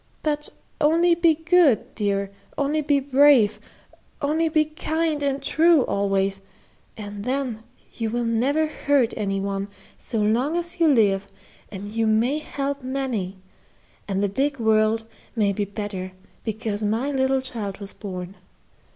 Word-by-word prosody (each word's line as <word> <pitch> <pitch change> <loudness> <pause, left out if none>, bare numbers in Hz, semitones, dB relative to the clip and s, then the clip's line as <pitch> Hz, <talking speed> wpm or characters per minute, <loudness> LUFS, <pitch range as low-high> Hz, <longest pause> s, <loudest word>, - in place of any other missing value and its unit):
But 295 -1 -1 0.3
only 335 +3 +4
be 335 -1 +4
good, 325 -5 +3
dear, 200 -2 -1 0.3
only 290 +2 +1
be 285 -1 +2
brave, 265 -6 +4 0.6
only 315 +3 +1
be 310 -1 +3
kind 315 0 -2
and 280 -1 -1
true 320 -2 +4
always, 195 -1 0 0.6
and 205 -1 -7
then 255 -2 -2 0.3
you 225 -2 -2
will 240 +1 -1
never 260 +7 +1
hurt 285 -5 +1
any 195 -2 -1
one, 195 0 -2 0.3
so 230 - -4
long 240 +10 +1
as 345 0 -3
you 335 - +5
live, 200 -8 +3 0.4
and 200 0 -7
you 225 +1 -1
may 235 +7 +2
help 280 -2 -4
many, 255 -8 -3 0.7
and 195 0 -1
the - - +3
big 270 +8 -1
world 220 0 +2 0.3
may 205 -3 +2
be 205 +1 -1
better 200 -2 -5 0.3
because 220 -1 -3
my 225 +7 0
little 265 -1 +2
child 215 -6 -5
was 200 -1 -8
born. 185 -3 -7
235 Hz, 140 wpm, -24 LUFS, 205-290 Hz, 0.7 s, you